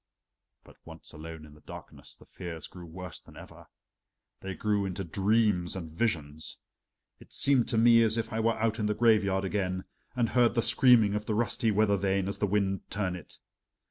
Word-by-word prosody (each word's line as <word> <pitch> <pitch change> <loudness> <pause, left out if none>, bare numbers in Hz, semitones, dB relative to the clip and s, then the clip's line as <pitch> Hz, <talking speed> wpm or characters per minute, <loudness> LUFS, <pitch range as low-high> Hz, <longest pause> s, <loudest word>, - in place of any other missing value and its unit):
But - - -18
once - - -11
alone 80 0 -9
in 75 - -15
the 75 - -18
darkness - - -11
the - - -19
fears 85 -3 -8
grew 90 -2 -11
worse 90 +2 -7
than - - -17
ever. - - -13 0.7
They 95 -1 -6
grew 105 0 0
into 95 0 -3
dreams 100 0 +1
and 85 -4 -6
visions. 80 -6 -3 0.6
It - - -17
seemed 135 -4 +2
to 120 - -1
me 115 +1 +6
as 110 0 +3
if 115 - -3
I 110 - -1
were 115 +1 +1
out 110 +1 0
in 105 - 0
the 105 - 0
graveyard 105 -4 +3
again, 95 -1 -2 0.3
and 120 -2 +1
heard 120 -1 +3
the 115 - +2
screaming 115 -3 +5
of 105 0 -3
the 110 - 0
rusty 115 +1 +1
weather 105 -1 +2
vane 95 0 0
as 100 - -3
the 105 - +1
wind 95 -1 -1
turned 95 -3 -2
it. 90 - -12
100 Hz, 195 wpm, -29 LUFS, 90-115 Hz, 0.7 s, me